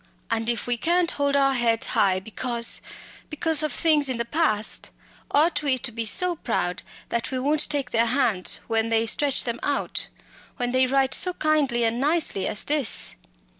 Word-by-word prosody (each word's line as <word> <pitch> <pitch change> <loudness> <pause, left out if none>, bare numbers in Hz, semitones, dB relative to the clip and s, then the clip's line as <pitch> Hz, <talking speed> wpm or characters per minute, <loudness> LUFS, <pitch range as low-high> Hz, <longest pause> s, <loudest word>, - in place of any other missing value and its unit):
And 225 0 -1
if 235 -3 -2
we 245 -1 -1
can't 345 +5 +1
hold 285 -1 -1
our 275 -1 +3
heads 235 -3 +1
high 190 -2 +1
because 235 +4 -2 0.5
because 315 0 +3
of 305 -1 -1
things 300 -4 +2
in 255 - -2
the 235 - -2
past 235 -7 0 0.4
ought 305 +1 +2
we 280 -3 +1
to 250 0 -3
be 230 0 -4
so 350 - +3
proud 180 - -2 0.3
that 235 -1 -2
we 260 - -3
won't 290 +4 +1
take 275 -4 -1
their 230 0 +2
hands 230 -7 +1
when 225 0 -1
they 225 0 +1
stretch 275 +4 +2
them 235 -1 -4
out 285 -1 -1 0.5
when 245 -1 -2
they 255 0 +2
write 270 0 +1
so 365 0 +3
kindly 295 -7 +1
and 230 +1 0
nicely 295 - 0
as 205 - -2
this?" 290 -6 0
255 Hz, 180 wpm, -24 LUFS, 230-295 Hz, 0.5 s, our